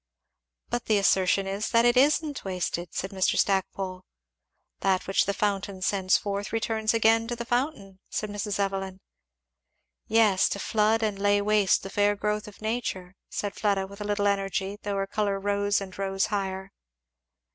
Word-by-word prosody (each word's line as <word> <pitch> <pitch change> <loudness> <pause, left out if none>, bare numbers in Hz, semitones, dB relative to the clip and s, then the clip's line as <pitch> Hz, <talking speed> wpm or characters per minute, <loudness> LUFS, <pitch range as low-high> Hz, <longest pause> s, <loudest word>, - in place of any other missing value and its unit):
"But 240 0 -2
the 215 - +3
assertion 195 0 +3
is 195 +2 -2
that 230 0 +4
it 240 +1 +4
isn't 290 +2 +2
wasted," 180 -2 -3
said 190 - -4
Mr. 190 -1 +1
Stackpole. 190 -1 0 0.8
"'That 190 -1 +1
which 195 - +1
the 200 - +1
fountain 200 -2 -2
sends 190 -1 +2
forth 200 0 -4
returns 225 -1 0
again 225 0 +3
to 240 - -3
the 235 0 -6
fountain,'" 240 -6 -2
said 215 -1 -3
Mrs. 205 0 -3
Evelyn. 195 -1 -2 1.1
"Yes, 215 -4 +4
to - - -2
flood 220 +2 +2
and 210 -2 -1
lay 205 0 +3
waste 205 -1 +2
the 195 - -7
fair 205 0 +2
growth 210 +1 -2
of 210 +1 -13
nature," 215 -5 -3 0.2
said 205 -1 -3
Fleda 200 -2 0
with 200 +2 -11
a - - -3
little 205 0 0
energy, 195 0 0
though 205 -1 -3
her 195 0 0
colour 200 0 -1
rose 205 0 +1
and 190 -2 -8
rose 195 0 0
higher. 190 -1 -3
200 Hz, 170 wpm, -27 LUFS, 195-215 Hz, 1.1 s, that